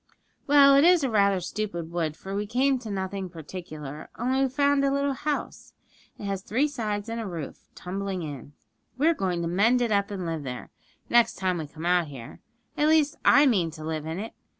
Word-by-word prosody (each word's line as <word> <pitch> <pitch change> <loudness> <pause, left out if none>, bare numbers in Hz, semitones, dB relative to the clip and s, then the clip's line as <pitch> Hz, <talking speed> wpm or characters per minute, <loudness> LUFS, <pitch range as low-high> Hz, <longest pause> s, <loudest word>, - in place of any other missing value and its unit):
'Well, 280 -1 +7
it 280 - +6
is 345 -3 +5
rather 200 -5 +3
a 185 - -3
stupid 175 -3 -4
wood, 160 -3 -2
for 195 - -7
we 205 +1 -2
came 260 +4 +2
to 230 -3 -8
nothing 190 -1 -3
particular; 155 -3 -8
only 260 +3 0
we've 265 -2 +1
found 285 0 +2
a 275 - +3
little 280 0 0
house. 295 +2 -4 0.4
It - - -10
has 195 -1 -2
three 250 +9 +1
sides 215 -7 -3
and 230 0 -3
a 220 - -5
roof 165 -6 -7
tumbling 190 0 -4
in. 145 -2 -8 0.4
We're 315 +5 +4
going 180 - -2
to - - -1
mend 210 +8 +3
it 240 -2 0
up, 200 -1 +1
and 195 -3 -4
live 165 -2 -3
there, 125 -3 -7 0.4
next 235 -1 +4
time 185 -2 -1
we 155 - -5
come 160 +3 -9
out 175 -2 +2
here. 130 -5 -10 0.4
At 300 - +2
least, 310 -2 +3
I 285 - +6
mean 195 - +2
to 155 -1 -10
live 155 -1 -3
in 160 +2 -4
it. 220 +3 -6
200 Hz, 210 wpm, -26 LUFS, 170-260 Hz, 0.4 s, Well